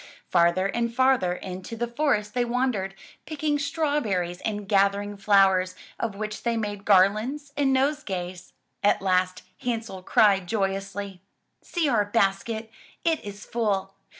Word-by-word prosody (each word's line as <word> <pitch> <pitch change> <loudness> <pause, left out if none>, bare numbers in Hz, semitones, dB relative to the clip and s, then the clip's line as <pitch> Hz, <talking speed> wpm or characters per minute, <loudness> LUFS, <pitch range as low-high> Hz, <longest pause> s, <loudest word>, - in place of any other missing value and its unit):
Farther 170 +1 +3
and 235 +3 -1
farther 255 -7 +3
into 185 +4 -7
the 235 +1 -1
forest 235 -5 0
they 245 - +1
wandered, 235 -6 -1 0.3
picking 300 -1 -1
straw 295 +1 0
berries 180 -7 -2
and 210 -2 -3
gathering 200 0 +2
flowers, 195 -2 +3 0.2
of 220 -4 -2
which 215 +1 -5
they 235 -1 0
made 205 -2 -4
garlands 215 +9 +3
and 285 -2 +2
nosegays. 195 -11 -1 0.3
At 205 - +3
last 185 -1 +1 0.2
Hansel 225 -6 -3
cried 195 -1 +3
joyously: 195 -1 -3 0.4
''See 340 -4 -1
our 225 -6 +2
basket! 220 +2 0 0.3
It 325 -2 +1
is 205 0 -8
full! 200 -4 -1
205 Hz, 135 wpm, -26 LUFS, 195-240 Hz, 0.4 s, Farther